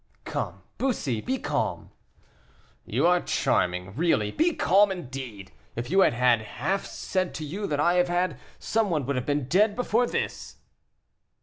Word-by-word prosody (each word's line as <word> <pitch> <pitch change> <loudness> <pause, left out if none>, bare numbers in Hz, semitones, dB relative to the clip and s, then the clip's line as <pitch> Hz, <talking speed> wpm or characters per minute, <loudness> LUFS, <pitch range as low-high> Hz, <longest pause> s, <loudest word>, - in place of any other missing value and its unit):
"Come, - - -4 0.2
Bussy, 145 - -1
be 265 - -1
calm." - - -2 1.0
"You - - +1
are 180 0 +4
charming, 90 +2 0
really; 130 -9 +1
be 335 +1 +1
calm, 195 +7 +4
indeed! 130 - -7 0.2
if 120 +4 -4
you 190 - +4
had 190 - +5
had 120 -1 +3
half 190 - -2
said 185 -2 -2
to 155 - -4
you 195 +7 -4
that 145 -1 -1
I 170 +4 +4
have 180 - -1
had, 175 -5 0 0.2
some 220 -2 0
one 155 -6 0
would 140 +2 -1
have 125 -1 -3
been 145 -3 0
dead 205 +6 +3
before 245 -1 +1
this." - - -4
165 Hz, 165 wpm, -26 LUFS, 125-195 Hz, 1.0 s, had